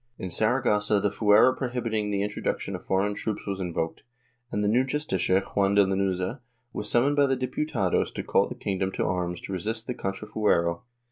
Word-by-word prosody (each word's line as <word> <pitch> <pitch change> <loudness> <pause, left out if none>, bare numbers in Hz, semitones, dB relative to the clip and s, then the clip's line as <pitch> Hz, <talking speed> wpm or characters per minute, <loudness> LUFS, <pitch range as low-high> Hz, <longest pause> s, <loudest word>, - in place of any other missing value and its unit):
In 95 - -5
Saragossa 105 -1 +2
the 100 0 0
fuero 105 +5 +5
prohibiting 115 -5 -2
the 100 -1 0
introduction 105 0 -3
of - - -8
foreign 100 +2 +1
troops 105 +1 -4
was 100 -1 -3
invoked, 85 -3 -3 0.5
and 105 - -1
the - - +2
new 120 +5 +3
Justicia, 130 -9 +1
Juan 100 0 0
de 100 -1 +6
Lanuza, 95 +4 -1 0.3
was 105 0 -3
summoned 135 +5 +3
by 145 -1 +4
the 135 - +2
Diputados 130 - 0
to - - -3
call - - +2
the - - -7
king 95 -2 -3
dom 95 0 0
to - - -1
arms 90 -1 -2
to 95 - -6
resist 110 +5 -3
the 125 - -3
contrafuero. 95 -5 0
105 Hz, 190 wpm, -26 LUFS, 95-115 Hz, 0.5 s, de